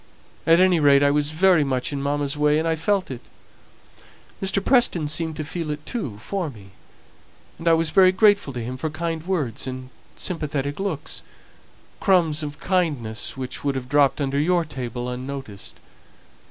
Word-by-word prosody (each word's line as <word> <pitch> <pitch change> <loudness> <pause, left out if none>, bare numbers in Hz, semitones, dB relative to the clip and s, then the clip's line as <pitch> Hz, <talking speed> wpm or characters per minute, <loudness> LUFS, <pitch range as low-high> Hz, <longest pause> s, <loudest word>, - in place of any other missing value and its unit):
At 165 +1 +6
any 185 -2 +4
rate, 140 -1 +5
I 140 - +4
was 145 0 +1
very 170 0 +4
much 130 0 -2
in 140 - -3
mamma's 145 +1 -1
way, 150 0 +3
and 160 +1 0
I 165 - +1
felt 190 +1 0
it. 125 - -6 1.2
Mr. 195 0 0
Preston 240 - +3
seemed 160 +1 -2
to 155 - -4
feel 160 +1 -5
it 150 0 -5
too 145 - -4
for 175 - -3
me; 100 -7 -14 0.9
and 165 - -5
I 165 - +6
was 165 -1 +2
very 185 +1 +6
grateful 200 -4 +3
to 120 -2 -4
him 125 +3 -5
for 155 +4 -3
kind 165 +1 -3
words 145 - -1
and 130 0 -6 0.2
sympathetic 145 -4 -3
looks 180 -7 -4 0.8
crumbs 170 -5 +2
of 145 -1 -6
kindness 145 - -1
which 130 -1 -6
would 140 -1 0
have 130 -1 -4
dropped 140 -1 +3
under 140 0 0
your 170 +2 +2
table 125 -3 -5
unnoticed. 125 -4 -7
150 Hz, 170 wpm, -23 LUFS, 135-170 Hz, 1.2 s, At